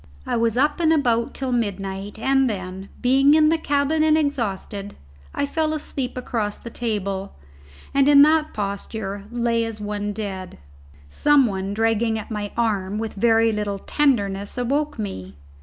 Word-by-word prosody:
I -, -, -1 dB
was 230 Hz, 0 st, +1 dB
up 295 Hz, +5 st, +2 dB
and 325 Hz, -2 st, +3 dB
about 240 Hz, -7 st, +1 dB
till 265 Hz, -1 st, -2 dB
midnight, 200 Hz, -3 st, -3 dB
and 270 Hz, +2 st, +2 dB
then, 190 Hz, -1 st, -6 dB
being 275 Hz, +4 st, +5 dB
in 305 Hz, -1 st, +5 dB
the 325 Hz, -, +3 dB
cabin 290 Hz, +1 st, +1 dB
and 310 Hz, 0 st, +4 dB
exhausted, 205 Hz, -8 st, -2 dB, 0.4 s
I 285 Hz, -, 0 dB
fell 310 Hz, +2 st, -1 dB
asleep 265 Hz, -4 st, -4 dB
across 220 Hz, -4 st, -2 dB
the 235 Hz, -, -10 dB
table, 200 Hz, -5 st, -3 dB, 0.6 s
and 275 Hz, 0 st, +4 dB
in 285 Hz, -1 st, +8 dB
that 310 Hz, 0 st, +3 dB
posture 200 Hz, 0 st, -4 dB
lay 235 Hz, -1 st, 0 dB
as 225 Hz, -1 st, -5 dB
one 205 Hz, 0 st, -3 dB
dead. 195 Hz, -3 st, -6 dB, 0.5 s
Some 280 Hz, -, +4 dB
one 195 Hz, -2 st, -3 dB
dragging 225 Hz, 0 st, +1 dB
at 220 Hz, -, -7 dB
my 210 Hz, -1 st, -3 dB
arm, 205 Hz, -4 st, 0 dB
with 225 Hz, 0 st, -3 dB
very 225 Hz, +1 st, +3 dB
little 210 Hz, -2 st, -2 dB
tenderness, 200 Hz, -6 st, 0 dB
awoke 285 Hz, +5 st, -1 dB
me. 95 Hz, -, -6 dB
225 Hz, 155 wpm, -22 LUFS, 200-275 Hz, 0.6 s, in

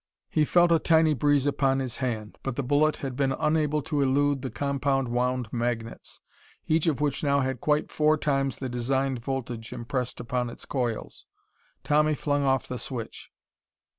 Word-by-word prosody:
He 155 Hz, -, +3 dB
felt 175 Hz, +2 st, +4 dB
a 165 Hz, -, +5 dB
tiny 160 Hz, -1 st, +4 dB
breeze 145 Hz, 0 st, +2 dB
upon 135 Hz, -2 st, +2 dB
his 130 Hz, -3 st, -3 dB
hand. 110 Hz, -5 st, -4 dB
But 135 Hz, -3 st, -3 dB
the 140 Hz, -, -2 dB
bullet 145 Hz, +4 st, +2 dB
had 130 Hz, -2 st, -4 dB
been 135 Hz, 0 st, +1 dB
unable 150 Hz, 0 st, +1 dB
to 145 Hz, 0 st, -1 dB
elude 140 Hz, 0 st, +2 dB
the 130 Hz, -, -4 dB
compound 140 Hz, -2 st, 0 dB
wound 125 Hz, -1 st, -1 dB
magnets, 120 Hz, -1 st, -3 dB, 0.5 s
each 160 Hz, +1 st, +1 dB
of 150 Hz, -5 st, +1 dB
which 145 Hz, -1 st, -1 dB
now 140 Hz, -1 st, +3 dB
had 130 Hz, -2 st, -2 dB
quite 150 Hz, 0 st, +1 dB
four 155 Hz, 0 st, +3 dB
times 135 Hz, -3 st, 0 dB
the 130 Hz, -, -4 dB
designed 130 Hz, +2 st, -1 dB
voltage 120 Hz, -3 st, -4 dB
impressed 125 Hz, +1 st, -3 dB
upon 125 Hz, 0 st, -2 dB
its -, -, -10 dB
coils. 120 Hz, -5 st, -3 dB, 0.6 s
Tommy 150 Hz, +1 st, +3 dB
flung 145 Hz, 0 st, 0 dB
off 135 Hz, -1 st, +1 dB
the 125 Hz, -, -5 dB
switch. 120 Hz, -4 st, -6 dB
135 Hz, 170 wpm, -27 LUFS, 125-145 Hz, 0.6 s, a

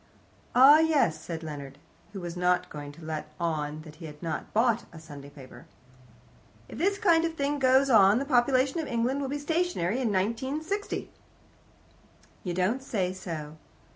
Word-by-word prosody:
"Ah, 275 Hz, +5 st, +8 dB
yes," 290 Hz, -, +2 dB
said 165 Hz, 0 st, -6 dB
Leonard, 140 Hz, -3 st, -7 dB, 0.3 s
who 200 Hz, -, -7 dB
was 175 Hz, -1 st, -6 dB
not 180 Hz, 0 st, +1 dB
going 145 Hz, -1 st, -7 dB
to 165 Hz, -, -14 dB
let 155 Hz, -1 st, -5 dB
on 155 Hz, -2 st, -2 dB
that 155 Hz, -1 st, -13 dB
he 165 Hz, -, -9 dB
had 150 Hz, +1 st, -12 dB
not 165 Hz, -, -4 dB
bought 235 Hz, +1 st, +2 dB
a 165 Hz, -, -12 dB
Sunday 145 Hz, -3 st, -11 dB
paper. 140 Hz, -3 st, -14 dB, 1.0 s
"If -, -, -9 dB
this 395 Hz, +3 st, +1 dB
kind 340 Hz, -6 st, +3 dB
of 330 Hz, -1 st, -2 dB
thing 285 Hz, -1 st, -1 dB
goes 265 Hz, +1 st, +4 dB
on 210 Hz, -4 st, +6 dB
the 275 Hz, -, -1 dB
population 265 Hz, +2 st, +2 dB
of 315 Hz, -, -3 dB
England 245 Hz, +3 st, 0 dB
will 270 Hz, -, -3 dB
be 290 Hz, -, -2 dB
stationary 290 Hz, -, -1 dB
in 230 Hz, -4 st, 0 dB
1960." 265 Hz, -, -2 dB, 1.3 s
"You 180 Hz, -, -3 dB
don't 200 Hz, +9 st, 0 dB
say 190 Hz, -8 st, -2 dB
so." 160 Hz, -5 st, -7 dB
210 Hz, 170 wpm, -28 LUFS, -, 1.3 s, Ah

